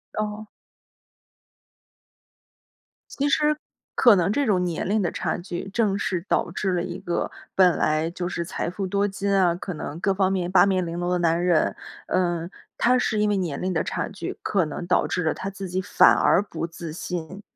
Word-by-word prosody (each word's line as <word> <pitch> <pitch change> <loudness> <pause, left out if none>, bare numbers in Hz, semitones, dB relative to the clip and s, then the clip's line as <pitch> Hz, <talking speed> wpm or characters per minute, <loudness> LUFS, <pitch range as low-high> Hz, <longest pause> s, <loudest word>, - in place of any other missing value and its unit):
哦。 215 0 -3 2.7
其 285 - +2
实 285 - +4 0.6
可 235 -4 +7
能 180 +1 +2
这 285 +5 +1
种 195 -6 +2
年 175 0 -2
龄 215 +2 +2
的 175 - +1
差 - - -2
距， 175 +1 -6
正 200 -1 +1
是 180 -3 -2
导 - - +1
致 190 -2 -1
了 175 - 0
一 180 0 -5
个 175 - -2 0.2
本 180 -3 +5
来 155 +2 +1
就 175 0 -4
是 170 -1 -3
财 170 - -3
富 190 +2 -4
多 200 +2 +1
金 200 0 -2
啊， 180 -3 +3
可 180 0 -5
能 155 +1 -6
各 195 +1 +2
方 190 0 +1
面 180 -2 -1
八 190 - +6
面 185 -2 +1
玲 170 +1 -4
珑 175 - -1
的 180 - +2
男 170 0 +2
人 170 -3 +2 0.3
呃， 175 -2 0 0.3
他 250 +1 +3
是 215 -3 0
因 210 0 +2
为 205 - +1
年 170 -7 -2
龄 185 0 -1
的 160 - +1
差 - - -2
距， - - -6
可 190 -4 +1
能 155 +3 -5
导 180 - +2
致 180 - -1
了 160 - +1
他 195 - -5
自 195 -1 -7
己 185 +2 -1
反 - - +5
而 195 - +3
不 170 - -5
自 165 -1 -8
信、 180 +2 -5
185 Hz, 215 characters per minute, -24 LUFS, 175-200 Hz, 2.7 s, 可